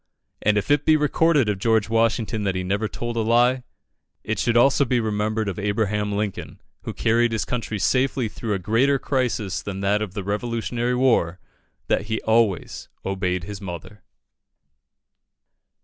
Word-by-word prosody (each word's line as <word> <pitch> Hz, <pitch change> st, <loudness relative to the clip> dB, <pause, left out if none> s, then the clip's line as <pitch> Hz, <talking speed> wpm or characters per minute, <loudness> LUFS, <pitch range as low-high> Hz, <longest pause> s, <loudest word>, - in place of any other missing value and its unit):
And 105 Hz, 0 st, +2 dB
if 105 Hz, -, -1 dB
it 145 Hz, 0 st, +3 dB
be 155 Hz, 0 st, +4 dB
recorded 150 Hz, -2 st, +2 dB
of 105 Hz, -2 st, -1 dB
George 110 Hz, 0 st, +2 dB
Washington 115 Hz, -1 st, 0 dB
that 100 Hz, -2 st, -1 dB
he 95 Hz, -, -2 dB
never 100 Hz, +4 st, -1 dB
told 120 Hz, +2 st, -5 dB
a -, -, +2 dB
lie, 120 Hz, +3 st, +3 dB, 0.6 s
it -, -, -2 dB
should 120 Hz, 0 st, +2 dB
also 135 Hz, +3 st, +5 dB
be 125 Hz, -2 st, +1 dB
remembered 110 Hz, 0 st, -1 dB
of 100 Hz, -1 st, -3 dB
Abraham 105 Hz, 0 st, -1 dB
Lincoln, 100 Hz, -1 st, -4 dB, 0.2 s
who -, -, -5 dB
carried 115 Hz, +1 st, +2 dB
his 110 Hz, -2 st, -1 dB
country 115 Hz, -3 st, -3 dB
safely 130 Hz, +4 st, +1 dB
through 105 Hz, 0 st, -3 dB
a -, -, 0 dB
greater 115 Hz, +9 st, +2 dB
crisis 120 Hz, -8 st, -1 dB
than 95 Hz, -1 st, -5 dB
that 100 Hz, +2 st, +1 dB
of 100 Hz, -4 st, -5 dB
the 100 Hz, -, -3 dB
Revolutionary 115 Hz, +4 st, -2 dB
War, 115 Hz, -9 st, +2 dB, 0.5 s
that 105 Hz, -, 0 dB
he 110 Hz, 0 st, -1 dB
always 110 Hz, -4 st, 0 dB, 0.2 s
obeyed 90 Hz, -2 st, -1 dB
his 100 Hz, +2 st, -7 dB
mother. 95 Hz, +2 st, -8 dB
110 Hz, 165 wpm, -23 LUFS, 100-120 Hz, 0.6 s, also